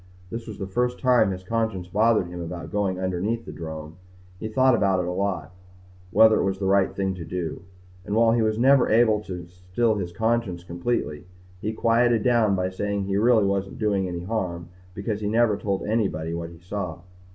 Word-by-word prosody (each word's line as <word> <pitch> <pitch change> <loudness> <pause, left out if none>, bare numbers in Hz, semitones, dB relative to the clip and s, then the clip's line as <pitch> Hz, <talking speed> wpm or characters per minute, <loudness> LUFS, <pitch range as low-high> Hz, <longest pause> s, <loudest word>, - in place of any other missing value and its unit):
This 115 0 -6
was 110 - -7
the 95 - -4
first 125 +6 -1
time 125 -5 +4
his 95 -1 -5
conscience 110 -3 -2
bothered 105 +2 +3
him 85 0 -7
about 85 0 -6
going 95 -2 -1
underneath 95 +5 -2
the - - -7
drome. 80 0 -7 0.4
He 110 - -4
thought 130 +4 +3
about 95 -5 +2
it 90 - -1
a 90 - -2
lot 90 -4 -2 0.6
whether 110 +3 +6
it - - +1
was 95 0 0
the 95 - -3
right 95 0 +3
thing 95 -1 -1
to 90 -3 -7
do. 80 -1 -4 0.4
And 105 +2 -3
while 115 0 +5
he 115 0 +2
was 110 -1 +1
never 135 +2 +5
able 110 -1 +4
to 90 -2 -6
still 90 +6 -1
his 95 -5 -3
conscience 110 -3 -1
completely, 85 -3 -3 0.4
he 110 - -1
quieted 115 0 +2
down 115 -5 +3
by 90 0 -1
saying 100 +1 -2
he 95 0 -1
really 110 -1 +4
wasn't 100 0 -1
doing 100 -3 0
any 85 -1 -5
harm 90 -5 -3 0.3
because 105 +1 -3
he'd 105 - -1
never 115 -1 +3
told 100 -1 -2
anybody 95 -8 -1
what 85 0 -4
he 85 - -13
saw. 90 -1 -5
100 Hz, 200 wpm, -25 LUFS, 90-110 Hz, 0.6 s, whether